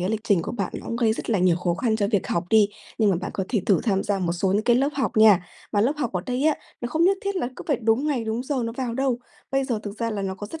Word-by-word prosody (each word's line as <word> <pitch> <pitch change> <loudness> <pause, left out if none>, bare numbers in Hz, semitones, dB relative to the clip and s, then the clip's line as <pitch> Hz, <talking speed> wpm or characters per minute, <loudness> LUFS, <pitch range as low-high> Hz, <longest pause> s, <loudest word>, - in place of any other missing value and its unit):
cái 180 - -1
lịch 220 -1 -1
trình 190 -6 +3
của - - -5
bạn 240 - -3
nó - - -11
cũng 230 - -3
gây 225 -2 +2
rất 230 - -5
là 210 - +2
nhiều 180 -2 +3
khó 175 -1 0
khăn 220 +2 0
cho 200 -2 0
việc 205 -4 +1
học 170 +1 -1
đi, 215 -2 +5 0.3
nhưng 210 -3 +4
mà 180 - +2
bạn - - -4
có 190 - -1
thể 220 -6 +1
thử 195 - +4
tham 195 -4 +1
gia 205 -2 -1
một 175 -2 0
số 185 +2 0
những 210 +2 +2
cái 240 -1 +4
lớp 270 +3 +2
học 255 -7 -1
nha. 215 -5 +7 0.3
Mà 205 - +2
lớp 250 +7 +3
học 250 -8 -2
ở 180 - -1
đây 250 +2 -1
á, 310 -2 +4 0.3
nó 240 - -3
không 320 +6 +2
nhất 390 +1 +4
thiết 400 -1 -2
là 245 - -1
cứ - - -8
phải 285 - +3
đúng 225 +6 +2
ngày, 260 -6 0
đúng 225 +2 -2
giờ 280 +1 -2
nó 230 - -3
vào 245 -3 -2
đâu. 265 -2 0 0.3
Bây 270 0 +1
giờ 240 -5 -1
thực 205 +1 -7
ra 230 -1 -1
là 205 -2 -3
nó 190 -1 -2
có 205 +2 -7
rất 325 - -7
220 Hz, 340 wpm, -24 LUFS, 200-255 Hz, 0.3 s, nha